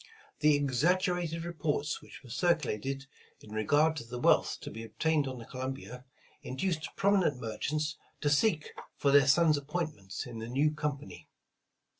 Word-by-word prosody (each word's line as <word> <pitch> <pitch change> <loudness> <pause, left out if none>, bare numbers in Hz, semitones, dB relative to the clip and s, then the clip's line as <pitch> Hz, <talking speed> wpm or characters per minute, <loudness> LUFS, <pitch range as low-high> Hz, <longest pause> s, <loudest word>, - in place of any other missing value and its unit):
The 150 -1 +5
exaggerated 165 +4 +1
reports 150 -3 -2
which - - -13
were 125 - -12
circulated 135 - 0 0.3
in 105 - -14
regard 145 +9 +3
to 120 - -4
the 120 +1 -7
wealth - - +3
to - - -7
be 110 +2 -7
obtained 150 +5 0
on 130 -1 -5
the 115 - -9
Columbia, 130 0 -6 0.4
in 125 - -6
duced 160 0 -1
prominent 195 -9 +2
merchants 150 +7 -2 0.2
to 145 - +2
seek 155 +1 +2 0.3
for 140 - +2
their 140 -1 +6
sons 155 +1 +5
ap 140 - -15
pointments 150 - -4
in 120 -2 -7
the 115 +1 -6
new 145 +5 +2
company. 145 - -5
145 Hz, 160 wpm, -31 LUFS, 125-155 Hz, 0.4 s, their